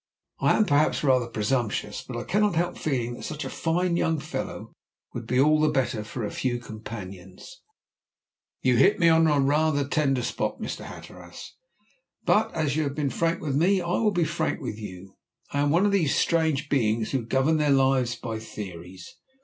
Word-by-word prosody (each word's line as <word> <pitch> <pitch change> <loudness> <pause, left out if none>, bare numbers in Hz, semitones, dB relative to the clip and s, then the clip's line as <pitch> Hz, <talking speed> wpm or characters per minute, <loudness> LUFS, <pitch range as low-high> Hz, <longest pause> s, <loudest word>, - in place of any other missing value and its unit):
I - - +3
am 215 - +4
perhaps 150 -2 +2
rather 130 -4 +3
presumptuous, 110 -2 -2
but 125 - -7
I 120 - -4
cannot 210 -1 +1
help 175 +2 0
feeling 125 -5 -2
that - - -9
such 155 +1 -5
a - - -5
fine 170 +2 0
young 160 -2 +1
fellow - - -6 0.4
would - - -6
be 125 +1 +1
all 155 +2 +4
the 155 - +4
better 130 -6 -1
for 115 +2 -6
a - - -4
few 125 -2 -1
companions." 110 - -10 1.0
"You - - +3
hit 400 - +5
me 170 - +4
on 165 0 +5 0.2
rather 150 +1 +2
a 140 - -2
tender 135 -4 +1
spot, - - -2
Mr. - - -5
Hatteras. - - -11 0.7
But, - - +3
as 155 -4 0
you 155 - +1
have 140 -2 -2
been 145 -3 -1
frank 165 0 0
with 140 -3 -1
me, 185 +6 +3
I 175 -1 -3
will 220 - +3
be 175 -5 +1
frank 160 +1 -2
with 125 -7 -5
you. 95 -2 -10 0.3
I 140 - -1
am 145 0 +2
one 170 +6 +3
of 205 - +2
those 175 -8 +2
strange 160 -3 +1
beings 110 -6 0
who 130 -3 -1
govern 135 +7 +1
their 150 -1 +1
lives 130 -3 +3
by 115 -2 -5
theories. 95 -4 -9
140 Hz, 190 wpm, -26 LUFS, 120-160 Hz, 1.0 s, hit